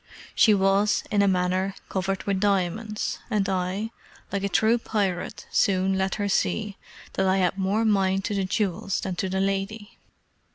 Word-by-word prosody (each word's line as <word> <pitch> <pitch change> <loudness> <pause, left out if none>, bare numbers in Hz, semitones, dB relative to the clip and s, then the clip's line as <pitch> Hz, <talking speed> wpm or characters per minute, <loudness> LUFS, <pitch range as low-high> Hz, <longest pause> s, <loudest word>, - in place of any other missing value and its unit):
She 215 -2 +5
was, 195 +2 +2
in 205 -1 +3
a 200 - +4
manner, 185 +1 +1
covered 190 0 -2
with 195 -2 0
diamonds, 205 +2 -1
and 210 -4 +1
I, 190 +3 -2 0.4
like 200 -1 -2
a 200 - 0
true 225 +4 +3
pirate, 200 -4 -2
soon 190 -1 +2
let 190 0 0
her 205 -1 -1
see 205 +1 0 0.4
that 190 - +1
I 190 +1 +3
had 180 -1 +1
more 200 +4 +1
mind 195 -2 +2
to 210 - -2
the 195 -1 0
jewels 195 0 -1
than 190 -2 -3
to 190 - -1
the 190 +1 -1
lady. 195 +2 -2
195 Hz, 170 wpm, -25 LUFS, 190-205 Hz, 0.4 s, She